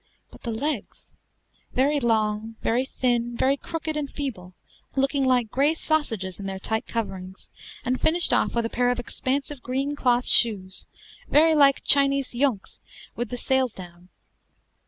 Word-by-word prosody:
But - - -15
the 235 - -5
legs! 260 +1 -4 0.6
very 285 +3 +2
long, 220 -2 0
very 245 +3 +1
thin, 240 -2 -1
very 270 +3 +3
crooked 315 +2 -5
and 295 -2 -2
feeble, 185 -11 -6 0.4
looking 275 0 +1
like 250 -4 +2
gray 290 +4 +2
sausages 225 - -1
in 195 - -5
their 190 0 -4
tight 220 +3 -3
coverings, 190 -4 -5 0.3
and 255 +1 -1
finished 340 +2 +3
off - - +1
with 235 -1 +1
a - - -2
pair 245 0 +1
of 245 - 0
expansive 265 +3 -3
green 270 +3 -2
cloth 245 -3 +1
shoes, 190 -5 +2 0.4
very 320 +2 +5
like 280 -3 +4
Chinese 275 -1 +3
junks 245 -5 -1 0.4
with 240 - -3
the 245 - -4
sails 260 -1 +1
down. 175 -1 -12
250 Hz, 155 wpm, -25 LUFS, 220-275 Hz, 0.6 s, very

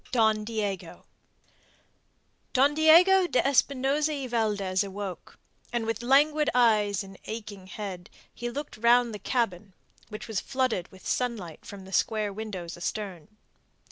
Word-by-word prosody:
DON 220 -3 +3
DIEGO 210 -3 -4 1.5
Don 275 +3 +4
Diego 350 +5 +6
de 255 - +1
Espinosa 280 +2 +2
y 280 -3 -3
Valdez 210 -5 0
awoke, 195 -1 -7 0.3
and 235 -2 -1
with 225 0 -2
languid 295 +4 +3
eyes 210 -5 +3
in 195 -1 -13
aching 210 -4 -7
head, 190 -3 -7 0.2
he 240 - -4
looked 285 +2 -6
round 235 +1 +4
the 210 - -6
cabin, 200 -6 -2 0.4
which 215 +2 -8
was 220 -3 -1
flooded 255 -9 -1
with 190 - -16
sunlight 220 -10 -2
from 195 -2 -9
the 190 - -11
square 215 +1 +1
windows 195 -5 -6
astern. 190 0 -5
220 Hz, 135 wpm, -27 LUFS, 195-255 Hz, 1.5 s, Diego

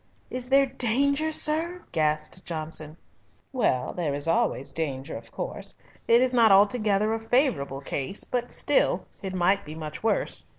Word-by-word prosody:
"Is 250 0 -2
there 275 +1 +5
danger, 280 +5 +1
sir?" 330 +4 +3
gasped 155 +2 -1
Johnson. 155 -1 -5 0.6
"Well, 210 - 0
there 155 -6 -2
is 145 +2 -6
always 165 - 0
danger, 140 -3 -4
of - - -10
course. - - -6 0.3
It 235 +2 +5
is 255 0 +1
not 230 -3 +5
altogether 210 +1 +3
a 225 - -2
favourable 225 - 0
case, 140 +7 -4
but 245 -1 -3
still - - +1 0.2
it 190 -1 -5
might 190 +3 +2
be 155 +1 -9
much 155 -1 -7
worse. 225 -1 +1
205 Hz, 155 wpm, -26 LUFS, 155-250 Hz, 0.6 s, there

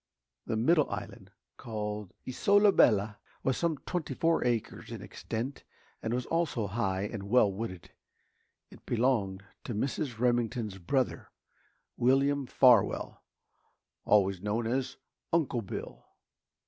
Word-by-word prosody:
The 110 - -1
middle 150 +6 +3
island, - - -7 0.3
called 105 -3 -5 0.2
Isola 200 +10 +4
Bella, 105 - +3 0.2
was 130 - +1
some 165 -3 0
twenty 160 -7 -3
four 165 +3 +2
acres 120 -3 -2
in - - -6
extent 120 +5 -5 0.4
and 110 - -3
was 125 +1 -1
also 165 -9 0
high 95 -2 -1
and 100 -1 -5
well 105 -4 +4
wooded. 95 -4 -6 0.8
It - - -15
belonged 110 -6 +1 0.2
to 120 - -4
Mrs. 130 +1 -2
Remington's 120 -4 0
brother, 130 +8 -1 0.7
William 135 +2 +2
Farwell, 125 -6 +3 0.8
always 100 -3 +3
known 105 +3 -1
as 130 +3 -2 0.3
"Uncle 155 -8 +1
Bill." 100 - -7
120 Hz, 120 wpm, -30 LUFS, 105-135 Hz, 0.8 s, Isola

